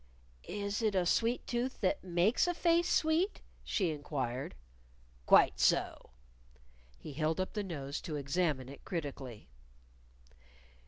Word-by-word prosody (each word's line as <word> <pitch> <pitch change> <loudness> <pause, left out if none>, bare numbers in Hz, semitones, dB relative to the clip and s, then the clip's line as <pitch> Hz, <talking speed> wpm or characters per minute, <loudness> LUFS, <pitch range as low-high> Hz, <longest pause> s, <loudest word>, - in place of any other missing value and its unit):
"Is 200 +1 -3
it 215 -3 +1
a 185 -2 +2
sweet 230 +7 +1
tooth 250 +1 -2
that 295 - +1
makes 185 - +2
a 350 - 0
face 340 0 +3
sweet?" 325 +6 +2 0.2
she 185 -6 0
inquired. 140 -4 -3 0.7
"Quite - - +6
so." - - +1 0.9
He 145 - -9
held 155 +3 0
up 185 - -2
the 210 - -1
nose 145 -7 -5
to 155 - -5
examine 145 -2 0
it 140 - -11
critically. 140 - -5
175 Hz, 125 wpm, -33 LUFS, 145-230 Hz, 0.9 s, Quite